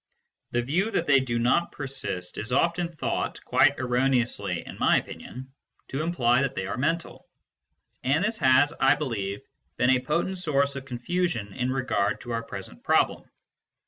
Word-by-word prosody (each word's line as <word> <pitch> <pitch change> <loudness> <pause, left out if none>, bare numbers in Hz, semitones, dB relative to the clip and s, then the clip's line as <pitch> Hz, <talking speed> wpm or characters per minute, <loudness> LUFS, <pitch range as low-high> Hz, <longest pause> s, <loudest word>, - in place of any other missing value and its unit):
The 120 0 0
view 175 - 0
that 170 - 0
they 140 -3 +5
do 120 -3 -2
not 125 +9 +2
persist 135 -10 -4
is 115 +4 -5
often 170 +5 +1
thought, 165 - -3
quite - - +4
erroneously 125 -1 0
in - - -10
my - - +4
opinion, 130 +2 -7 0.4
to 135 - -2
imply 130 -7 +2
that 135 -1 -1
they 95 - -2
are 95 - -3
mental; 165 +7 -2 0.8
and 140 +7 +2
this 220 +2 -1
has, 130 +2 +4
1 135 - +5
believe, 105 -9 -3 0.4
been 125 +1 +4
a 130 - +4
potent 170 +7 -1
source 140 -4 +1
of 135 -1 -6
confusion 125 - -2
in 125 -1 -1
regard 130 -6 0
to 120 - -7
our 115 0 -1
present 95 - -9
problem. - - +1
130 Hz, 165 wpm, -26 LUFS, 120-150 Hz, 0.8 s, they